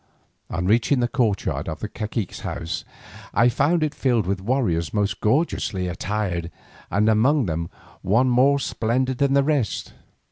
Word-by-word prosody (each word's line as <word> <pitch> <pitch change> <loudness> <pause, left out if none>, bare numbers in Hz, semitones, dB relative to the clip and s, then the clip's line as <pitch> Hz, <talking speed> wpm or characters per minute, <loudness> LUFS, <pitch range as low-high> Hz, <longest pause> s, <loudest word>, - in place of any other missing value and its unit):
On 85 +2 -2
reaching 115 +7 +3
the 120 - +2
courtyard 110 -9 -1
of 80 -1 -5
the - - -2
cacique's 105 -1 -4
house, 80 0 -4 0.5
I 120 +3 +5
found 155 +7 +2
it 155 -1 -1
filled 120 -7 +1
with 95 +1 -2
warriors 100 - 0
most 100 -1 0
gorgeously 105 - 0
attired, 90 -2 -2 0.4
and 105 +4 +2
among 120 +6 +3
them 85 -1 -3 0.3
one 115 +7 +3
more 130 +3 +4
splendid 130 0 -1
than 140 -1 +2
the 140 - +4
rest. 140 -8 -1
110 Hz, 150 wpm, -23 LUFS, 95-130 Hz, 0.5 s, I